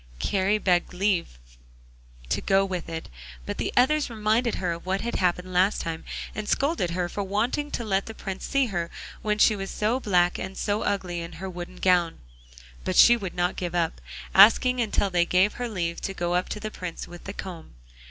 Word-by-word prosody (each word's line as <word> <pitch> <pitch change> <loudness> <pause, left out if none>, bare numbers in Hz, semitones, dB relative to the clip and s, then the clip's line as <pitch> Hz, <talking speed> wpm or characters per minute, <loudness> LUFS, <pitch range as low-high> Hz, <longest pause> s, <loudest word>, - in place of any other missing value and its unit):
Kari 195 - +1
begged 180 -4 +2
for 180 - -12
leave 185 - 0 0.9
to - - 0
go 195 0 +3
with 180 -4 -4
it, 165 0 -5 0.4
but - - -5
the - - -1
others 285 +4 +3
reminded 225 +1 +1
her 180 -2 -1
of 170 0 -5
what 190 +1 -1
had 235 - -2
happened 180 0 0
last 185 +3 +3
time, 165 -1 -4 0.3
and 215 -1 -5
scolded 280 - +1
her 175 +1 -1
for 200 - -4
wanting 230 +9 -1
to 240 - -3
let 195 -3 0
the 225 - -7
Prince 195 -2 -6
see 275 -1 +2
her 175 -7 -3 0.3
when 210 -1 0
she 215 +1 +5
was 195 -1 -5
so 220 +5 0
black 180 -6 +2
and 190 0 -6
so 205 +1 -1
ugly 180 -3 -1
in 170 - -7
her 190 - -6
wooden 180 +1 -7
gown, 180 -3 +2 0.7
but - - -2
she 240 - +8
would 195 -6 -5
not 175 0 0
give 175 -1 -4
up 170 -1 -1 0.3
asking 245 +5 +6
until 205 -3 0
they 175 -1 +3
gave 185 +4 +3
her 245 -1 -4
leave 170 -5 -3
to 195 - -4
go 175 -1 -1
up 180 +1 0
to 210 - -4
the 215 +1 -5
Prince 180 -4 -6
with 175 0 -12
the 200 - -5
comb. 175 - -8
190 Hz, 210 wpm, -26 LUFS, 175-215 Hz, 0.9 s, she